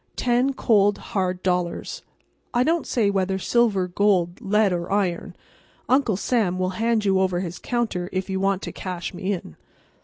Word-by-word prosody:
Ten 250 +2 +1
cold, 205 -5 +3 0.2
hard 185 -2 -1
dollars—I 185 - -3
don't 330 +3 0
say 215 -5 +1
whether 190 -1 0
silver, 200 -2 +2
gold, 180 0 +1
lead 210 -2 +2
or 175 +1 -3
iron—Uncle 205 +5 -2
Sam 205 -4 0
will 185 0 0
hand 230 -2 +1
you 190 -1 +3
over 185 -2 +1
his 175 -2 -5
counter 220 -8 -2
if 185 0 -2
you 190 -1 -2
want 195 0 0
to - - -4
cash 180 -1 -5
me 190 +2 -3
in. 170 - -7
195 Hz, 155 wpm, -23 LUFS, 180-225 Hz, 0.2 s, cold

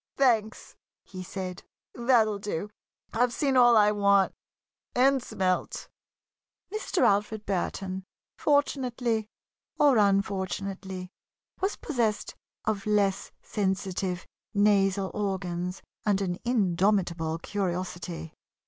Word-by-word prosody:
"Thanks!" 225 -5 +1 0.3
he 185 -1 -9
said. 185 0 -5 0.3
"That'll 235 -4 +3
do! 205 0 -4 0.4
I've 245 +2 +2
seen 275 +1 0
all 240 -2 +7
I 210 -1 +6
want 200 -2 +3 0.6
and 270 +1 +4
smelt!" 185 -6 -2 0.8
Mr. 430 -4 0
Alfred 210 +1 +2
Burton, 190 0 -2 0.3
fortunately 250 -6 +1 0.5
or 280 -6 +5
unfortunately, 195 -2 -1 0.5
was 390 +2 0
possessed 235 -8 -1 0.3
of 215 -2 -1
less 200 -2 +1
sensitive 190 -2 -2 0.3
nasal 195 -2 +3
organs 180 -3 -3 0.2
and 205 -2 +2
an 180 -2 -2
indomitable 185 -7 +1
curiosity. 180 -3 -4
200 Hz, 95 wpm, -28 LUFS, 185-225 Hz, 0.8 s, all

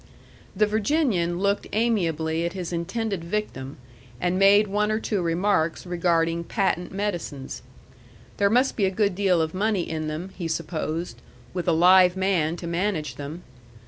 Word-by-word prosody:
The 210 - +4
Virginian 210 - +1
looked 200 +2 0
amiably 165 -8 0
at 170 +1 -2
his 180 -2 -5
intended 190 +2 -2
victim, 170 -8 -4 0.4
and 180 +6 0
made 200 +2 +6
one 210 +2 0
or 215 - 0
two 210 -4 -1
remarks 170 -1 0
regarding 170 -1 +1
patent 190 -3 -1
medicines. 175 -9 -4 0.8
There 200 0 +3
must 250 +5 +2
be 205 - +2
a - - +2
good 200 +1 +1
deal 185 -3 +2
of 160 - -4
money 200 -1 0
in 155 -1 -3
them, 160 +5 -5
he 170 - -4
supposed, 160 -4 -3 0.3
with 180 -1 -3
a - - +4
live 180 +2 +6
man 180 -4 +1
to 175 - -8
manage 170 -5 -1
them. 150 +5 -7
180 Hz, 155 wpm, -25 LUFS, 165-200 Hz, 0.8 s, made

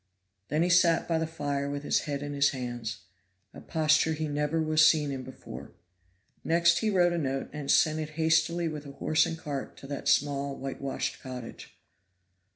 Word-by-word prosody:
Then 155 +2 +1
he 175 - +1
sat 175 -2 +4
by 165 -1 +1
the 160 - -1
fire 145 -3 -3
with 145 0 -4
his - - +2
head 140 0 -2
in 145 0 -4
his 140 0 +3
hands 120 -4 -5 0.5
a - - -11
posture 155 0 +2
he 155 0 -3
never 150 +2 -1
was 155 -1 +3
seen 150 -2 +4
in 135 -1 -4
before. 70 - -10 0.7
Next 170 +1 +3
he 220 - 0
wrote 175 -3 +3
a 170 - -1
note 135 -2 -3
and 150 -2 -6
sent 155 +1 +4
it 155 -1 -4
hastily 160 +1 +2
with 150 -2 -6
a 140 - -9
horse 155 +3 +2
and 165 - -4
cart 145 -4 -6
to - - -12
that 140 0 -5
small 140 -1 +1
whitewashed 135 0 -4
cottage. 125 -3 -9
150 Hz, 185 wpm, -28 LUFS, 140-160 Hz, 0.7 s, sat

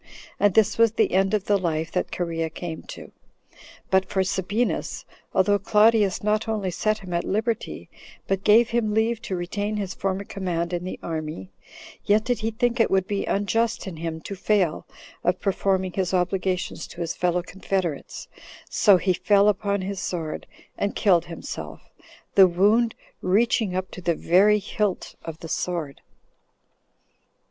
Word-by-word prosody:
And 205 -3 +3
this 220 0 +3
was 230 -1 +5
the 220 -2 +2
end 195 +3 +2
of 205 -1 -2
the 205 -1 +2
life 165 -2 -2
that 180 - -1
Cherea 165 -2 -2
came 160 0 -6
to. - - -9 0.8
But 190 0 +3
for 190 - +1
Sabinus, 195 +5 -1 0.3
although 205 +2 +3
Claudius 210 -1 +3
not 215 +1 +1
only 210 -4 -1
set 215 +4 0
him 185 -4 -8
at 170 - 0
liberty, 220 +2 -2 0.4
but 195 0 -1
gave 230 +3 +5
him 220 -3 0
leave 225 +1 +1
to 200 -5 -4
retain 205 +4 -3
his 195 -3 -3
former 195 0 -2
command 180 -3 -3
in 175 0 -2
the 185 - -5
army, 155 - -5 0.5
yet 210 +1 +3
did 245 0 -1
he 225 0 -1
think 240 +2 0
it 225 - +4
would 190 -1 +2
be 200 0 -2
unjust 225 +3 0
in 185 -4 -7
him 160 0 -4
to 200 - -6
fail 195 -4 0 0.4
of 180 +1 +1
performing 190 -2 0
his 190 -1 0
obligations 185 0 -1
to 175 - -9
his 165 -1 -2
fellow 180 0 0
confederates; 185 -4 -3 0.4
so 200 -3 +5
he 185 +1 +1
fell 200 +2 +3
upon 200 -1 +1
his 195 0 -4
sword, 165 -4 -4 0.3
and 200 - -1
killed 175 -5 +3
himself, 170 -1 -8 0.4
the 195 -2 +8
wound 210 +6 +3 0.3
reaching 210 0 +2
up 185 0 -3
to 185 - -8
the 170 -1 +1
very 195 +7 +4
hilt 205 -1 -2
of 165 -1 -8
the 165 - -6
sword. 160 -4 -3
195 Hz, 165 wpm, -24 LUFS, 175-210 Hz, 0.8 s, the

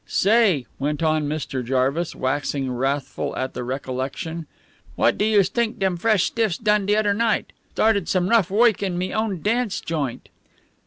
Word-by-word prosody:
"Say," 200 - +3
went 150 +3 -1
on 155 -2 +1
Mr. 140 -4 -3
Jarvis, 135 +7 0
waxing 135 0 -1
wrathful 135 +3 -2
at 130 0 -3
the - - -4
recollection, 135 +6 -4 0.5
"what - - +3
do - - -1
youse 205 -4 +4
t'ink 235 +1 -1
dem 190 -2 0
fresh 200 +1 +2
stiffs 220 -6 0
done 210 -2 +1
de 210 - +3
odder 210 -1 +2
night? 225 +1 0 0.2
Started 215 -5 +2
some 180 -1 +1
rough 220 -4 +3
woik 220 +1 +3
in 185 -3 -2
me 185 +1 -2
own 215 -6 -2
dance 225 -1 0
joint." 145 -7 -4
180 Hz, 165 wpm, -23 LUFS, 140-210 Hz, 0.5 s, youse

